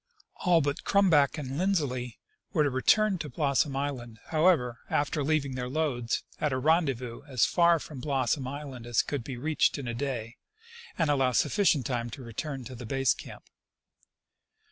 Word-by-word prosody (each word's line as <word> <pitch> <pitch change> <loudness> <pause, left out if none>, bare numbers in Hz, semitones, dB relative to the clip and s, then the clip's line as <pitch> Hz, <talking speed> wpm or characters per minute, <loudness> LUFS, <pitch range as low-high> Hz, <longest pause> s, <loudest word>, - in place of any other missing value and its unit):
All 175 -2 +3
but 145 0 -2
Crumback 165 -7 +3
and 140 0 -4
Lindsley 140 - -1 0.4
were 155 -5 +3
to 145 - +1
return 195 - +3
to 150 - -5
Blossom 140 -2 +1
island, 130 -5 -4
however, 155 -8 +2
after 145 +1 0
leaving 145 -2 0
their 125 -1 -4
loads 130 -5 -1 0.2
at 150 - 0
a 130 - 0
ren 160 +6 +3
dezvous 125 -3 -4
as 130 -4 +3
far 170 -1 +4
from 150 -3 -8
Blossom 135 0 0
island 135 -3 -7
as 120 -2 +2
could 140 -5 -4
be 130 0 -6
reached 155 +5 +1
in 140 -3 -5
a 120 - -2
day 120 -2 -4 0.6
and 160 -4 +2
allow 135 -3 +2
sufficient 165 - +2
time 120 -2 -2
to 130 +3 -9
return 130 +4 -5
to 130 - -9
the 120 -2 -8
base 135 +1 +2
camp. - - -11
140 Hz, 170 wpm, -28 LUFS, 125-155 Hz, 0.6 s, far